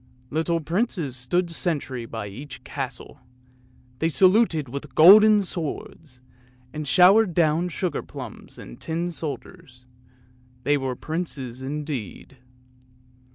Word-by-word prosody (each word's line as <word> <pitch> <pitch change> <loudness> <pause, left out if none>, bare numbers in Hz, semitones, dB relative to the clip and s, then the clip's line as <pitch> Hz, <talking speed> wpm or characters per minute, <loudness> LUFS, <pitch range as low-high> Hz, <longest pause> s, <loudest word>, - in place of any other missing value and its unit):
Little 165 +2 0
princes 170 - -2
stood 170 +8 -1
sentry 140 -8 -1
by 110 -2 -6
each 125 +6 -9
castle; 135 +1 -7 0.8
they 165 - +1
saluted 185 - +3
with 140 +3 -8
golden 210 +5 +8
swords, 155 -5 -6 0.5
and 150 -1 -5
showered 180 +6 +5
down 165 +1 +2
sugar 175 -2 -3
plums - - -10
and - - -12
tin 170 +2 -3
soldiers; 155 -4 -8 0.8
they 145 - +2
were 135 -2 -2
princes 135 -6 -5
indeed. 135 - -6
155 Hz, 110 wpm, -24 LUFS, 135-175 Hz, 0.8 s, golden